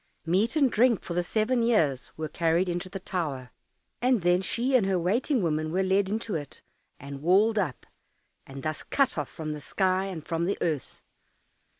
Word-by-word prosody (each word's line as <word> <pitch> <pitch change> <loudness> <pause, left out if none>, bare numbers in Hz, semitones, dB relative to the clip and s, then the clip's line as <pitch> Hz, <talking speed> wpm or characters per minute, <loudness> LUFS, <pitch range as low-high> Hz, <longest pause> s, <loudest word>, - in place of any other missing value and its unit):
Meat 195 - +1
and 280 -5 +3
drink 235 -1 +3
for 170 - -5
the 175 - +1
seven 220 +7 0
years 160 - +1
were 155 0 -3
carried 165 +3 +1
into 175 +1 -3
the 195 - -6
tower, 145 -9 -4 0.5
and 245 -5 +2
then 175 +1 +3
she 245 +7 0
and 220 -6 +4
her 190 -1 +2
waiting 225 - +1
woman 155 -1 -1
were 190 +3 +1
led 190 +1 +2
into 220 0 -2
it 145 -4 -6 0.4
and 140 0 -8
walled 205 +7 +4
up, 150 - -3 0.6
and 135 0 -9
thus 155 -1 -3
cut 275 -2 +1
off 150 -3 -3
from 155 -1 -5
the 150 - -7
sky 190 +4 0
and 180 -6 -6
from 165 0 -1
the 200 - -1
earth. 155 -6 -3
180 Hz, 190 wpm, -27 LUFS, 155-215 Hz, 0.6 s, and